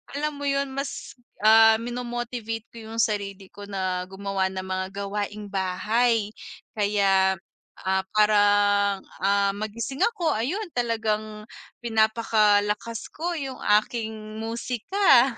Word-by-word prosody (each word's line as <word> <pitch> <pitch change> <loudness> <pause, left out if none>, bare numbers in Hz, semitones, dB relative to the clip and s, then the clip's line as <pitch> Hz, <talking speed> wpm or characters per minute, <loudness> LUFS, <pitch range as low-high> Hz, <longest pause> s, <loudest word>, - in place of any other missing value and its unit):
alam 300 +1 -1
mo 285 - -4
'yun 275 0 0
mas, 275 -1 -5 0.3
ah, 220 +1 +8
mino-motivate 240 -2 -4
ko - - -13
'yung 225 +1 -1
sarili 200 -3 -2
ko 205 - -10
na 185 -2 -2
gumawa 195 0 -2
ng 190 0 -4
mga 185 0 -2 0.2
gawaing 205 +1 -4
bahay 210 +4 +1 0.5
kaya, 195 -2 +3 0.5
ah, 190 0 0
parang, 205 -1 +4 0.2
ah, 200 0 +2
magising 225 +6 -4
ako 350 -8 0
ayun 320 - -1
talagang 215 -2 -1 0.4
pinapakalakas 220 -1 +1
ko 345 +3 -3
'yung 270 -5 -4 0.2
aking 220 -1 -5 0.2
musika. 245 - +2
215 Hz, 115 wpm, -25 LUFS, 200-240 Hz, 0.5 s, ah